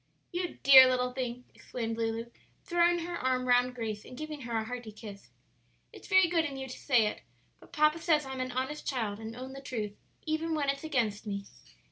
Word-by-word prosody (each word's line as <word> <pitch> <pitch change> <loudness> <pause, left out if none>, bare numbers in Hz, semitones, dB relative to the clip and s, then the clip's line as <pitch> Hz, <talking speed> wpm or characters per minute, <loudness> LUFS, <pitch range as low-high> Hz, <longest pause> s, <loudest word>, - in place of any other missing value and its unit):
"You 355 0 -3
dear 265 -1 +10
little 250 0 0
thing!" 250 -1 -4
exclaimed 230 -2 -5
Lulu, 230 +1 -3 0.3
throwing 345 -1 +2
her 345 0 -4
arm 255 0 0
round 250 0 +3
Grace 220 -3 -4
and 250 - -11
giving 310 -1 -6
her 235 -2 -3
a 220 - 0
hearty 240 -1 -6
kiss; 205 -2 -11 0.6
"it's - - -12
very 380 -3 +5
good 335 -1 +2
in 280 -4 -4
you 265 0 -5
to 255 - -9
say 245 -6 +3
it; 210 - -3 0.4
but - - -18
papa 305 0 +3
says 320 -3 +2
I'm 265 -1 -5
an 255 0 -3
honest 260 +4 -3
child 220 -6 -2
and 225 +1 -7
own 260 +2 -7
the 275 - -8
truth 215 -6 -4 0.3
even 320 +1 -1
when 285 -2 0
it's 275 +1 -8
against 230 -9 -1
me." 200 -1 -4
255 Hz, 205 wpm, -30 LUFS, 230-305 Hz, 0.6 s, dear